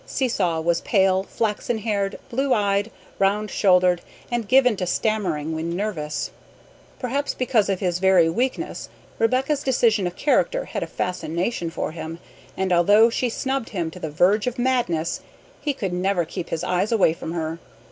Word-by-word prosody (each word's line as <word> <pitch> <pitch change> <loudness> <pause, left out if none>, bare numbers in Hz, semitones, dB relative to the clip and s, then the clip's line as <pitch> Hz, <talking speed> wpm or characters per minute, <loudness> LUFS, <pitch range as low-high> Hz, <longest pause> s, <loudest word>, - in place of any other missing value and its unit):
Seesaw 195 - 0
was 170 +1 +1
pale, 190 -2 +3
flaxen 220 +3 -2
haired, 205 -2 -1
blue 270 +2 +1
eyed, 200 0 +1 0.3
round 205 +2 +1
shouldered, 180 -3 +3 0.3
and 240 -3 -1
given 250 -2 +5
to 180 - -2
stammering 175 -7 -1
when 165 +2 -3
nervous. 175 -7 -3 0.7
Perhaps 280 +3 -2
because 240 -5 +1
of 190 -2 -1
his 180 -2 0
very 190 -3 +5
weakness 255 - -2 0.3
Rebecca's 260 +5 +1
decision 230 -8 +2
of 175 - -6
character - - +1
had - - -4
a - - -2
fascination 180 +1 -2
for 165 - -3
him, 160 0 -6 0.4
and 190 -1 +1
although 205 +7 +5
she 250 +1 0
snubbed 265 +1 -2
him 170 -5 -3
to 180 - -10
the 160 - -4
verge 190 +9 +2
of 250 +1 -2
madness, 240 -11 0 0.4
he 295 - 0
could 200 -10 -3
never 180 -1 +1
keep 175 +2 -6
his 165 0 -3
eyes 180 +4 0
away 205 -8 +4
from 165 0 -6
her. 165 -1 -3
195 Hz, 165 wpm, -23 LUFS, 175-235 Hz, 0.7 s, given